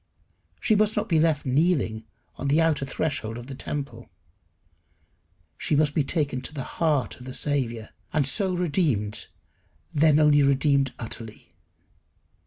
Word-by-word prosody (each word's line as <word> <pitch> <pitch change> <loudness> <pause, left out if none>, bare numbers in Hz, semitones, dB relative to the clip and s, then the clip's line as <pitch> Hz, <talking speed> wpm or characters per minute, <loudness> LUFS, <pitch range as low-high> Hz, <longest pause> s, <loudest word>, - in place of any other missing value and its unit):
She 220 - +2
must 215 +1 +2
not 210 +1 0
be 165 -6 +3
left 155 -2 +2
kneeling 130 -6 +1 0.3
on 140 - -4
the 145 +3 +3
outer 160 -4 +2
threshold 130 -7 -2
of 120 - -8
the 135 - -8
temple. 140 +1 -6 1.5
She - - 0
must 145 0 +2
be 150 - +2
taken 140 -3 -1
to 150 +4 -6
the 135 - -3
heart 145 -10 -1
of 125 - -11
the 130 - -5
Saviour, 120 -6 -2 0.2
and 150 -3 +1
so 190 +7 +1
redeemed, 145 - 0 0.7
then 150 0 +4
only 150 -1 +5
redeemed 140 -1 +3
utterly. 110 -5 -7
145 Hz, 145 wpm, -25 LUFS, 130-160 Hz, 1.5 s, only